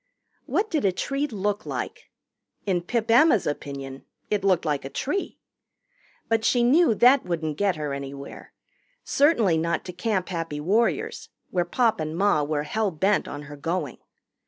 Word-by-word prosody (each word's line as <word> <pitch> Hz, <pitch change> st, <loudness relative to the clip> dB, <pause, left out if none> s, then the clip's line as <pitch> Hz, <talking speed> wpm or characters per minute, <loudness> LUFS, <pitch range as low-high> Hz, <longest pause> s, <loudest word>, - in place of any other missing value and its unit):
What 430 Hz, +2 st, 0 dB
did 305 Hz, -, 0 dB
a 195 Hz, -, +3 dB
tree 275 Hz, +9 st, -2 dB
look 205 Hz, -3 st, -2 dB
like? -, -, -5 dB, 0.6 s
In 185 Hz, -4 st, +1 dB
Pip 225 Hz, +5 st, -1 dB
Emma's 240 Hz, -, +5 dB
opinion 140 Hz, -2 st, -5 dB, 0.3 s
it 205 Hz, -2 st, +1 dB
looked 185 Hz, -3 st, +2 dB
like 145 Hz, -2 st, -1 dB
a 135 Hz, -, -6 dB
tree. 325 Hz, -, -3 dB, 0.9 s
But 225 Hz, -1 st, +1 dB
she 240 Hz, +1 st, +3 dB
knew 260 Hz, 0 st, +4 dB
that 250 Hz, +5 st, +5 dB
wouldn't 160 Hz, -3 st, -2 dB
get 200 Hz, -3 st, +2 dB
her 150 Hz, -2 st, -3 dB
anywhere 140 Hz, 0 st, -8 dB, 0.5 s
certainly 230 Hz, -, +3 dB
not 170 Hz, +1 st, -1 dB
to 180 Hz, -, -6 dB
Camp 190 Hz, 0 st, -1 dB
Happy 165 Hz, -4 st, -3 dB
Warriors, 235 Hz, -, 0 dB, 0.2 s
where 175 Hz, -2 st, +1 dB
Pop 230 Hz, +4 st, +1 dB
and 155 Hz, +1 st, -3 dB
Ma 195 Hz, -5 st, +3 dB
were 145 Hz, 0 st, -1 dB
hell 215 Hz, +7 st, 0 dB
bent 190 Hz, +5 st, +1 dB
on 145 Hz, -, -6 dB
her 145 Hz, 0 st, -9 dB
going. 155 Hz, -1 st, -3 dB
185 Hz, 160 wpm, -25 LUFS, 155-230 Hz, 0.9 s, Emma's